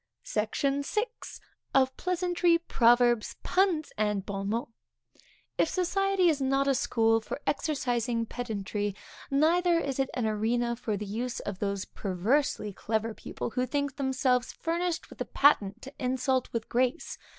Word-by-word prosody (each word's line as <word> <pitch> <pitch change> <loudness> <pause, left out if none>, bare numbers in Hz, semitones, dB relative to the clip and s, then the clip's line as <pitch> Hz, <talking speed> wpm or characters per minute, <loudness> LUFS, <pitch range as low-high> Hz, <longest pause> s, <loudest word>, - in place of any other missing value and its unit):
SECTION 275 +6 0
VI. 420 +9 0 0.7
Of 260 -1 +4
Pleasantry, 355 -1 +2
Proverbs, 240 -7 +3
Puns, 365 -5 +1
and 210 -2 0
Bon 195 0 -3
Mots. 230 +2 -2 0.9
If 325 - +3
society 390 0 +2
is 300 -4 +2
not 270 +1 +2
a 275 - +4
school 225 -3 +2
for 220 - -5
exercising 245 -6 0
pedantry, 210 -4 -3 0.3
neither 335 +5 +3
is 275 -5 -2
it 270 - +1
an 245 -3 0
arena 235 +3 0
for 220 -3 -3
the 210 - -5
use 235 +5 -3
of 200 -2 -5
those 200 -2 -2
perversely 210 +3 0
clever 220 +3 -2
people, 230 - -6
who 250 +2 -1
think 285 +1 -2
themselves 260 -2 +1
furnished 340 +1 -2
with - - -10
a - - 0
patent 235 -6 +3
to 270 - -9
insult 260 0 0
with 230 -1 -3
grace. 255 +6 -1
250 Hz, 145 wpm, -29 LUFS, 220-290 Hz, 0.9 s, Of